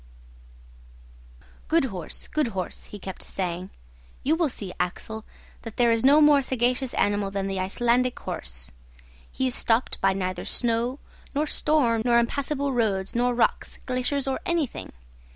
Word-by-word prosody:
"Good 330 -3 +3
horse! 185 -9 -6
good 305 -4 0
horse!" 185 - -4
he 210 - -9
kept 190 -1 -7
saying. 180 -1 -3 0.5
"You 300 +4 +3
will 325 -3 +2
see, 200 -7 -6
Axel, 215 +5 -3 0.4
that 225 -2 -9
there 240 -1 +4
is 230 -1 +2
no 280 +3 +7
more 295 -2 +7
sagacious 255 0 0
animal 205 -1 +1
than 195 0 -2
the 195 -1 -2
Icelandic 240 +6 +1
horse. - - -3 0.6
He 260 - -1
is 255 - +1
stopped 230 0 +1
by 195 0 +4
neither 185 -1 -2
snow, 240 +2 0 0.4
nor 295 +2 +2
storm, 290 -7 +2
nor 240 -1 +4
impassable 280 +3 0
roads, 200 -5 0
nor 245 +1 +2
rocks, 235 - +1
glaciers, 255 +2 0
or 270 -1 -1
anything. 335 -6 -1
235 Hz, 150 wpm, -26 LUFS, 195-265 Hz, 0.6 s, no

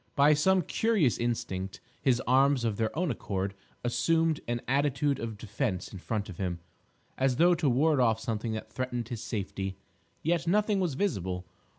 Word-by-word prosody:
By 145 +2 +6
some 185 +5 +3
curious 195 - +2
instinct, 95 -5 -2 0.2
his 130 -3 +2
arms 135 0 +4
of 110 -3 0
their 110 -1 +1
own 175 -3 +1
accord 100 -4 -3 0.3
assumed 160 +5 +2
an 120 0 -1
attitude 140 +1 +1
of 115 -2 -4
defence 105 -2 -2
in 95 - -7
front 105 +2 -3
of 90 - -9
him, 90 -3 -2 0.6
as 130 -1 +2
though 175 +6 +5
to 160 -4 +1
ward 145 +4 +3
off 115 -3 +3
something 110 -1 -2
that 110 - -6
threatened 125 -2 -3
his 120 -3 -4
safety. 95 -3 -4 0.5
Yet 170 +1 +1
nothing 210 +2 +2
was 175 -7 0
visible. 95 - -1
125 Hz, 170 wpm, -29 LUFS, 110-150 Hz, 0.6 s, By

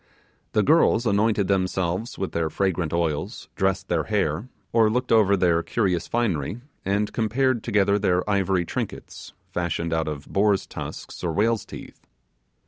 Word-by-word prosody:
The 105 - +3
girls 125 -4 +4
anointed 105 -1 +2
themselves 95 +2 -1
with 95 - -3
their 80 -1 -1
fragrant 90 -1 -1
oils, 80 -3 -2
dressed 95 -1 0
their - - 0
hair, 100 0 -1 0.2
or 115 -2 +5
looked 125 +3 -1
over 100 -3 +5
their 85 -2 +3
curious 90 -5 -1
finery, 105 - -1 0.2
and 100 +2 0
compared 120 +2 +1
together 100 -2 +2
their 90 -2 +1
ivory 95 -3 +1
trinkets, - - -6 0.2
fashioned 85 -1 -1
out 80 -1 0
of 75 -2 -5
boar's 100 0 +2
tusks - - -8
or 85 - 0
whale's 110 +4 +1
teeth. - - -11
100 Hz, 145 wpm, -24 LUFS, 85-110 Hz, 0.2 s, or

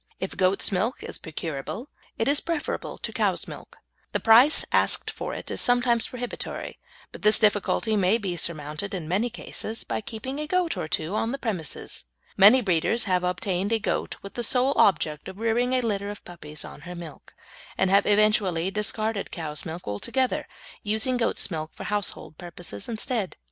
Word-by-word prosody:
If 190 - -4
goat's 185 +2 +3
milk 205 +6 -1
is - - -4
procurable 160 - -5 0.3
it 225 - 0
is 285 +1 +4
preferable 330 -3 -3
to - - -5
cow's - - 0
milk. - - -10 0.4
The - - +1
price 240 +7 +7
asked - - +3
for - - -5
it - - -6
is - - 0
sometimes 245 -2 +3
prohibitory, 245 -1 -6 0.3
but - - -10
this 215 +1 +5
difficulty 215 +1 +2
may 200 +2 +3
be 195 -6 -3
surmounted 155 +3 -3
in 165 -4 -5
many 200 +8 +1
cases 225 0 -4
by - - -3
keeping 260 +6 -6
a 300 - -3
goat 360 0 +1
or - - -3
two 160 +3 -2
on 225 +2 0
the 275 - -2
premises. 190 - -4 0.3
Many 210 +7 +8
breeders 200 +3 +1
have 180 -2 +1
obtained 185 +2 -1
a 225 - +3
goat 220 - -2
with 200 - -8
the 240 - -3
sole 255 +4 +3
object 155 -5 +2
of 190 - -8
rearing 230 +3 +1
a 255 - +3
litter 205 -4 -1
of 205 - -9
puppies 155 -3 -9
on - - -11
her 175 +3 -8
milk, 165 -5 -10 0.4
and 190 0 +2
have 200 - +4
eventually 205 -4 +3
discarded 215 0 -1
cow's 155 -2 -4
milk 165 +2 -7
altogether, 250 - -1 0.3
using 220 +5 +1
goat's 230 -4 0
milk 155 -1 -4
for - - -7
household 205 -6 -2
purposes 175 - -6
instead. 220 -3 -2
205 Hz, 180 wpm, -26 LUFS, 175-230 Hz, 0.4 s, Many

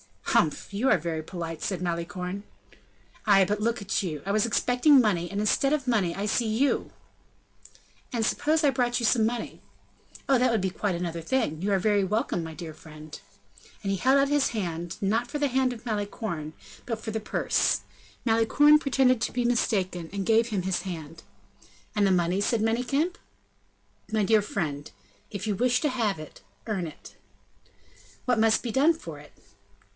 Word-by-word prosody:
"Humph! 155 +5 +1
you 235 +7 +1
are - - +5
very 160 -1 -3
polite!" 165 -1 -6
said 185 -3 -2
Malicorne. 180 +2 -3 0.8
"Ay, 195 -2 +6
but 205 +3 -1
look 230 +1 0 0.2
you, 155 -7 -4
I 200 - -1
was 215 +1 +2
expecting 250 +5 +4
money, 180 -7 +1
and, 200 +1 -2
instead 275 +6 +2
of 280 -4 -1
money, 195 -8 +1
I 200 - -3
see 225 +2 +1
you." 235 +6 +1 1.2
"And 230 -2 0
suppose 310 +6 +1
I 290 - +5
brought 245 -2 0
you 235 - -1
some 225 -1 +3
money?" 235 +1 -3 0.7
"Oh! 270 - +5
that 255 +1 +3
would 225 -4 +1
be 190 - 0
quite 190 0 -2
another 170 -1 -3
thing. 165 - -1
You 200 +2 0
are 195 - +3
very 205 0 +2
welcome, 195 -3 -1
my 160 0 -7
dear 160 -1 -8
friend!" 155 0 -11 0.6
And 195 - -1
he 195 - 0
held 260 +7 +4
out 275 0 +3
his 290 -1 +2
hand, 175 -6 -4
not 225 +5 0
for 295 - -3
the 290 -1 +1
hand 260 0 +1
of 235 0 -12
Malicorne, 205 -7 -3 0.3
but 230 -3 -3
for 220 - -4
the 220 - -2
purse. 215 - +1 0.4
Malicorne 250 +7 +5
pretended 265 -4 +2
to - - -1
be 245 - 0
mistaken, 190 -8 0
and 200 -1 -3
gave 225 +2 +3
him 210 -5 -1
his 190 -1 -1
hand. 165 -4 -7 0.7
"And 205 -1 +2
the - - +3
money?" 180 +1 +2
said 220 +2 +1
Manicamp. 255 +10 0 0.9
"My 215 -1 +1
dear 215 +1 +4
friend, 150 -8 -3 0.4
if 200 0 -5
you 210 -2 0
wish 250 +4 +2
to 300 - +1
have 225 - -1
it, 155 - -11 0.3
earn 190 -6 -2
it." 155 - -13 1.1
"What 245 -3 +2
must 225 0 +3
be 240 - -3
done 290 +8 +4
for 165 - -9
it?" 145 - -16
210 Hz, 180 wpm, -27 LUFS, 180-245 Hz, 1.2 s, Ay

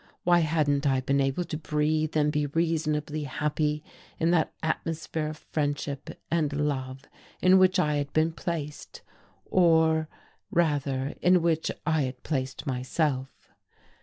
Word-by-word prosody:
Why 175 0 +5
hadn't 150 -3 +1
I 135 -1 +3
been 140 +2 +1
able 135 +6 0
to 155 -2 -5
breathe 155 0 0
and 150 0 +3
be 150 -1 0
reasonably 155 -1 -1
happy 150 +2 -1 0.4
in 165 +1 +2
that 165 -3 +2
atmosphere 160 0 -2
of 155 0 -6
friendship 145 -2 -3
and 160 -3 +1
love 135 -3 -2 0.4
in 185 +1 +6
which 185 +1 +4
I 150 -5 +2
had 145 -1 -2
been 160 +1 +2
placed 160 -3 -5 0.4
or 160 -3 +3 0.4
rather 145 -4 0
in 180 -1 +4
which 165 -1 +1 0.2
I 160 -2 +2
had 130 -1 -4
placed 135 -2 -3
myself?... 135 +1 -2
150 Hz, 135 wpm, -27 LUFS, 145-160 Hz, 0.4 s, in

